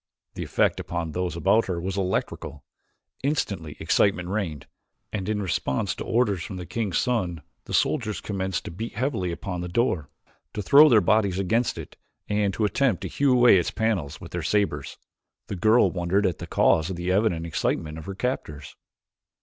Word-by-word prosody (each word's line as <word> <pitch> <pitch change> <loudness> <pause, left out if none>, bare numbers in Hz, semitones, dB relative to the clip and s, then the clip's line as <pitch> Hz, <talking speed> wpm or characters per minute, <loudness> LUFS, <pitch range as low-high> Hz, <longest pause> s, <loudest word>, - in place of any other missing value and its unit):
The - - -6
effect - - +1
upon 85 -2 -4
those 90 0 -2
about 105 +7 +3
her 90 -3 -2
was 95 +2 -3
electrical. 90 -6 -3 0.6
Instantly 100 - -2
excitement 90 -3 +2
reigned, 95 -8 -3 0.5
and 100 -1 -3
in 105 -1 -1
response 90 +1 -1
to - - -6
orders 110 -6 +1
from 95 +2 -6
the 90 - -6
king's 105 -3 -2
son 95 - -1 0.2
the - - -8
soldiers 115 -8 0
commenced 95 -3 -3
to - - -6
beat 110 +7 -6
heavily 110 -7 -1
upon 90 +1 -4
the 90 - -4
door, 90 - 0 0.5
to 105 - -3
throw 145 +9 +8
their 110 -4 +6
bodies 100 -1 +2
against 110 +6 0
it - - -9 0.3
and 105 -1 +1
to 110 - +1
attempt 115 -2 +1
to - - -3
hew 140 -1 +2
away 120 -7 +6
the - - -3
panels 100 -11 -1
with - - -10
their - - -3
sabers. 100 -9 -1 0.5
The - - -5
girl 110 +6 +4
wondered 95 +3 0
at 90 -4 -1
the - - -7
cause 80 +2 +3
of 95 - -3
the 90 +1 -2
evident 95 -4 +1
excitement 80 0 -2
of 80 - -10
her 100 - -5
captors. 75 - -4
95 Hz, 180 wpm, -25 LUFS, 85-110 Hz, 0.6 s, throw